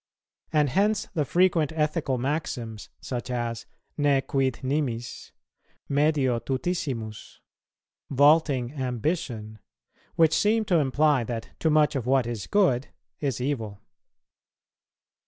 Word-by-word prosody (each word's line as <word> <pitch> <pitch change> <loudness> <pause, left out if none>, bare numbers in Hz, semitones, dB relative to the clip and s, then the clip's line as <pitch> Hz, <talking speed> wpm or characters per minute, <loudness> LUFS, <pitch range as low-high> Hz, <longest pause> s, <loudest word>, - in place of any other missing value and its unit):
And 150 -3 +3
hence 205 +4 +1
the 155 -5 0
frequent 170 -2 +2
ethical 150 -3 0
maxims, 120 -5 -3
such 125 -1 -5
as, 120 -2 -3 0.3
"Ne 145 -2 +3
quid 135 -2 -1
nimis," 130 -4 -3 0.6
"Medio 140 -4 +2
tutissimus," 130 -4 -4 0.7
"Vaulting 145 -2 +3
ambition," 125 -4 -3 0.6
which 160 -1 +4
seem 220 +4 +2
to 175 -4 +3
imply 145 -1 +2
that 115 -1 -5
too 160 - +1
much 150 -1 +3
of 125 -3 -2
what 135 -1 +3
is 115 -4 -5
good 150 -10 +2 0.3
is 135 -5 -2
evil. 115 -7 -3
135 Hz, 110 wpm, -26 LUFS, 120-155 Hz, 0.7 s, which